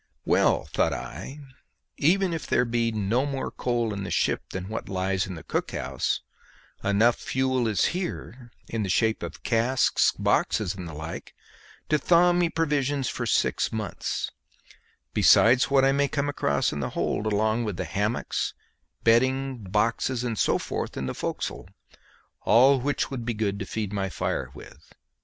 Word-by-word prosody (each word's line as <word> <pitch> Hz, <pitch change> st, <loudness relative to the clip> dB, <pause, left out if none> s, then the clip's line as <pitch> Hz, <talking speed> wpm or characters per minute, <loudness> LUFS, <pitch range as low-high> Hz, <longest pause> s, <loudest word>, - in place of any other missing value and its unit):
Well, -, -, +3 dB
thought -, -, +2 dB
I, 130 Hz, -, -7 dB, 0.5 s
even 180 Hz, +4 st, +2 dB
if 160 Hz, -, -4 dB
there 125 Hz, -, +2 dB
be 115 Hz, 0 st, 0 dB
no 110 Hz, +4 st, 0 dB
more 140 Hz, -2 st, -3 dB
coal 120 Hz, -3 st, -1 dB
in 100 Hz, -, -4 dB
the 100 Hz, -, -5 dB
ship -, -, +1 dB
than 95 Hz, 0 st, -5 dB
what 110 Hz, +2 st, -5 dB
lies 95 Hz, 0 st, -1 dB
in 95 Hz, -, -6 dB
the 80 Hz, -, -9 dB
cook -, -, -2 dB
house, -, -, -2 dB, 0.6 s
enough 110 Hz, +4 st, +3 dB
fuel 130 Hz, -2 st, 0 dB
is 105 Hz, -4 st, +2 dB
here 130 Hz, -9 st, -5 dB, 0.2 s
in 115 Hz, -, -3 dB
the 100 Hz, -, -2 dB
shape 110 Hz, +4 st, +2 dB
of -, -, -7 dB
casks, 120 Hz, +2 st, +2 dB
boxes, 100 Hz, -4 st, +1 dB
and 90 Hz, -3 st, -7 dB
the 80 Hz, -, -8 dB
like 80 Hz, +2 st, -7 dB, 0.5 s
to 150 Hz, -, +3 dB
thaw 175 Hz, +2 st, +4 dB
me 175 Hz, -1 st, +2 dB
provisions 145 Hz, -5 st, 0 dB
for -, -, -3 dB
six -, -, +1 dB
months, 110 Hz, -2 st, -3 dB, 0.8 s
besides 125 Hz, +3 st, +5 dB
what 135 Hz, -1 st, +4 dB
I 135 Hz, -, +4 dB
may 140 Hz, +1 st, +2 dB
come 145 Hz, +1 st, -1 dB
across 70 Hz, -, 0 dB
in 75 Hz, -, -4 dB
the -, -, -2 dB
hold, 105 Hz, -, -1 dB
along 110 Hz, +2 st, +1 dB
with 105 Hz, -5 st, -3 dB
the -, -, -2 dB
hammocks, 105 Hz, +4 st, -2 dB, 0.5 s
bedding, 130 Hz, +3 st, +3 dB
boxes, 115 Hz, +5 st, 0 dB
and 120 Hz, -2 st, -2 dB
so -, -, +2 dB
forth -, -, -4 dB
in 65 Hz, -, -2 dB
the 65 Hz, -, -3 dB
forecastle, -, -, -4 dB, 0.7 s
all 130 Hz, +3 st, +5 dB
which 145 Hz, +2 st, -1 dB
would 130 Hz, -3 st, -4 dB
be 120 Hz, -1 st, -2 dB
good 100 Hz, -2 st, -1 dB
to 95 Hz, -, -5 dB
feed 105 Hz, -2 st, -3 dB
my 95 Hz, -1 st, -1 dB
fire -, -, -2 dB
with. -, -, -14 dB
115 Hz, 170 wpm, -26 LUFS, 100-135 Hz, 0.8 s, besides